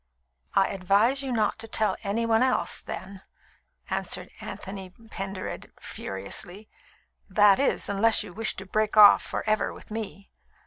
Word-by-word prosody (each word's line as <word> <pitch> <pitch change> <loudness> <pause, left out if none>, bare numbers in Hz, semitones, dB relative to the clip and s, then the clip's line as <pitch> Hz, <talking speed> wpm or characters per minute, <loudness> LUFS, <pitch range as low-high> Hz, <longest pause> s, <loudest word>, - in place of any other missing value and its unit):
"I 195 - +4
advise 200 +8 +2
you 270 -2 -4
not 225 -2 0
to 225 - -5
tell 220 -1 +1
any 220 +3 -1
one 225 0 +2
else, 255 -9 +2
then," 190 +2 -8 0.7
answered - - 0
Anthony 195 -1 -7
Pendered 195 -2 -7
furiously 175 - -5 0.6
"that 205 +1 +5
is, 280 - +1
unless 210 +3 +3
you - - -11
wish 220 +2 -2
to 190 - -8
break 215 +3 -1
off 205 -1 +9
for - - -5
ever 215 0 +1
with - - -13
me. 210 -2 -6
205 Hz, 145 wpm, -26 LUFS, 195-225 Hz, 0.7 s, off